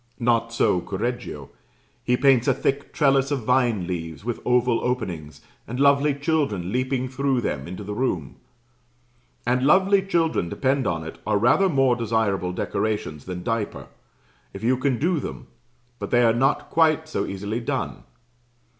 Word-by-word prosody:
Not 115 -1 +1
so 90 -6 +2
Correggio: 120 +7 -4 0.5
he 125 0 +2
paints 130 -2 +4
a - - +3
thick 140 +1 -1
trellis 135 -2 +2
of 140 -5 -2
vine 120 -5 +2
leaves, 85 0 -5
with 120 -1 -2
oval 125 -1 +2
openings, 90 -12 -3 0.3
and 125 +3 -5
lovely 140 +1 +4
children 140 - -1
leaping 130 +1 -1
through 130 0 0
them 70 - -3
into 95 +4 -7
the 105 +1 -5
room; 95 - -2 1.1
and 125 +1 +1
lovely 195 +6 +4
children, 165 - 0
depend 130 +2 0
upon 80 -1 -1
it, 80 - -9
are 105 -1 +2
rather 125 - +4
more 135 -5 +3
desirable 110 -6 0
decorations 90 -5 -3
than 90 -1 -6
diaper, 115 0 -3 0.6
if 100 - -8
you 125 +3 +3
can 130 -1 0
do 165 +5 +1
them - - -7 0.5
but - - -5
they 120 0 +4
are 115 -1 +4
not 135 +4 +1
quite 160 -1 +3
so 155 - -2
easily 100 +4 -3
done. 115 - -3
120 Hz, 155 wpm, -24 LUFS, 105-135 Hz, 1.1 s, paints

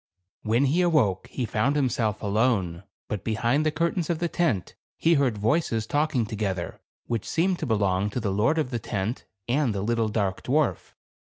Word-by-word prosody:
When 115 +5 +2
he 155 +7 +2
awoke, 145 - +2
he 125 - -2
found 120 +6 +1
himself 115 -7 0
alone; 100 -5 +1 0.2
but 105 -3 -4
behind 120 +6 +1
the 155 - +1
curtains 170 +2 -1
of 170 - +1
the 170 +1 0
tent, 160 - 0 0.2
he 165 - +3
heard 135 -8 +2
voices 115 0 +1
talking 145 -2 +1
together, 100 -5 -3 0.2
which 115 -3 -3
seemed 180 +2 +1
to - - -3
belong 100 -3 +1
to 115 - -3
the 105 -4 -1
lord 110 +11 +2
of 150 -5 0
the 120 - -1
tent, 105 +3 -3 0.2
and 125 -3 +1
the 100 - -2
little 115 0 +1
dark 100 -3 -1
dwarf. 150 +3 0
115 Hz, 180 wpm, -26 LUFS, 105-150 Hz, 0.2 s, he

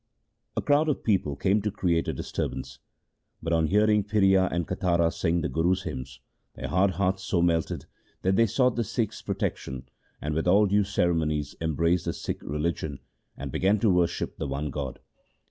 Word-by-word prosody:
A - - 0
crowd 150 +2 +3
of 145 - -1
people 95 -10 +1
came 100 +8 +2
to 105 - -1
create 85 -5 0
a - - -1
disturbance, 65 -1 -4 0.6
but, 85 0 -2
on 80 -1 +3
hearing 105 +2 +3
Phiria 95 -2 +3
and 85 -1 -1
Katara 85 -3 +1
sing 85 0 0
the - - -1
Guru's 90 +7 +1
hymns, 65 0 -6 0.3
their - - -5
hard 95 +3 +3
hearts 95 0 +1
so 90 - 0
melted 85 -2 0 0.4
that 95 +1 +2
they 115 +3 +4
sought 125 +3 +2
the 120 - +2
Sikhs' 110 0 -2
protection, 65 -1 -3 0.3
and 75 +1 -3
with 80 +3 -1
all 100 +4 +6
due 100 +1 +3
ceremonies 80 -7 0
embraced 85 +2 +1
the - - -1
Sikh - - -5
religion, 75 -1 -2 0.4
and 70 0 -5
began 100 +8 +2
to 105 0 +3
worship 90 -1 0
the - - -3
one 70 +2 -3
God. 70 -3 -4
85 Hz, 180 wpm, -27 LUFS, 75-100 Hz, 0.6 s, all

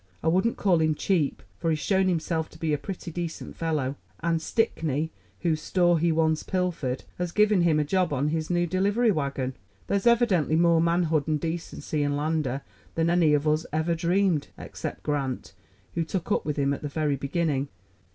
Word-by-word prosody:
"I - - +3
wouldn't 190 +7 +2
call 180 -5 +3
him 155 -1 +2
cheap, 160 -4 0 0.2
for 165 - 0
he's 160 - +2
shown 190 +4 +2
himself 165 -2 -1
to - - -15
be 160 -1 -1
a - - +2
pretty 170 +3 -6
decent 170 0 -5
fellow; 150 -5 -1 0.2
and 165 -1 +1
Stickney, 160 - 0 0.3
whose 160 -3 +1
store 175 0 +3
he 170 +1 +2
once 160 -1 +2
pilfered, 175 -9 -2 0.2
has 180 -1 -1
given 210 -1 +4
him 165 -3 +3
a - - +3
job 180 +3 +1
on 145 +1 +1
his 160 0 -2
new 175 -1 +2
delivery 200 +7 +2
wagon. 140 -5 -2 0.3
There's 200 +2 0
evidently 220 -10 +3
more 170 0 +4
manhood 165 -3 +2
and 155 -1 +1
decency 160 -1 -3
in 145 0 +1
Lander 150 -3 -1 0.3
than 165 +1 +2
any 165 -4 +4
of 150 +1 0
us 155 +2 +1
ever 160 +3 +1
dreamed 170 -1 +1
except - - -6
Grant, 135 -7 -2 0.4
who 170 - 0
took 180 +4 -4
up - - +1
with 150 -1 -2
him 140 0 +2
at - - -5
the 150 - -3
very 145 0 0
beginning." 140 0 -1
160 Hz, 190 wpm, -26 LUFS, 150-175 Hz, 0.4 s, given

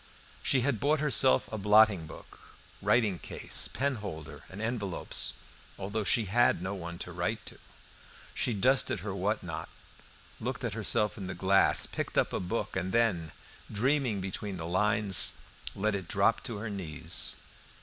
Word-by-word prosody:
She 130 - +2
had 125 -3 0
bought 150 +6 +1
herself 135 -3 +3
a 110 - -3
blotting 105 -4 +4
book, - - -13 0.4
writing 105 -7 +2
case, - - 0
pen 140 -1 -1
holder, 80 -8 -8
and 95 - -9
envelopes, 110 -5 -1 0.4
although 105 +3 -3
she 110 +2 +3
had 120 0 +2
no 95 +3 -4
one 85 -3 -7
to 90 - -10
write 90 +6 -3
to; - - -10 0.7
she - - 0
dusted 125 -2 +2
her 100 0 -5
what 100 +3 -2
not, 80 -3 -6 0.7
looked 125 +2 -4
at 115 -4 -2
herself 105 -1 0
in 95 - -6
the - - -5
glass, 95 +1 +3
picked - - -5
up - - +1
a - - -1
book, 95 +6 -4
and 95 0 -3
then, 100 -10 +1 0.4
dreaming 125 -1 0
between 95 +1 -4
the 80 - -6
lines, 100 +1 +6 0.4
let 110 +2 0
it 95 -3 -4
drop 105 +6 +1
on 115 - -5
her 110 +2 -5
knees. 80 -3 -3
105 Hz, 160 wpm, -29 LUFS, 95-115 Hz, 0.7 s, lines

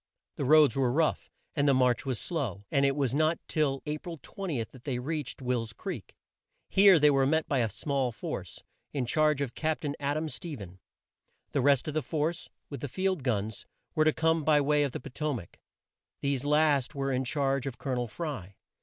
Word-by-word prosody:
The 140 - -2
roads 150 -2 +6
were 130 -3 +2
rough, 155 +4 +1 0.3
and 145 -1 +2
the 140 - +5
march 125 0 +2
was 130 -3 0
slow, 125 - -2
and 140 0 +3
it 135 - +1
was 135 -4 0
not 155 +3 +2
till 140 -4 0
A 150 0 -2
pril 165 -1 -8
20 170 -12 -3
that 120 +3 -15
they 135 -4 -2
reached 145 0 -4
Will's 120 -3 -1
Creek. 165 - -7 0.5
Here 195 -2 +7
they 150 -1 +5
were 135 -1 +3
met 160 +2 +1
by 140 - +1
a 115 -2 +1
small 135 +4 -1
force, 115 - -6 0.3
in 135 -4 -1
charge 150 +3 +2
of 135 -4 -2
Cap 160 -1 -1
tain 145 -2 -2
Ad 145 +1 0
am 155 +1 -2
Ste 155 -1 -6
phen. 95 -3 -10 0.7
The 140 - +1
rest 140 +1 +3
of 155 - -2
the 155 - +1
force, 160 +3 -2 0.2
with 140 -4 -7
the 145 - -3
field 185 +4 -1
guns, 110 -4 -2 0.3
were 155 -2 +3
to 155 - +5
come 160 0 +1
by 150 0 +4
way 145 +1 +3
of 145 -2 +1
the - - -5
Po 135 - -10
to 150 0 -1
mac. 95 -8 -9 0.6
These 140 -1 0
last 150 -1 +2
were 135 0 -1
in 130 0 0
charge 135 0 0
of 130 - -5
Col 135 - -4
o - - +1
nel 120 -1 -1
Fry. 105 - -6
140 Hz, 215 wpm, -29 LUFS, 125-155 Hz, 0.7 s, Here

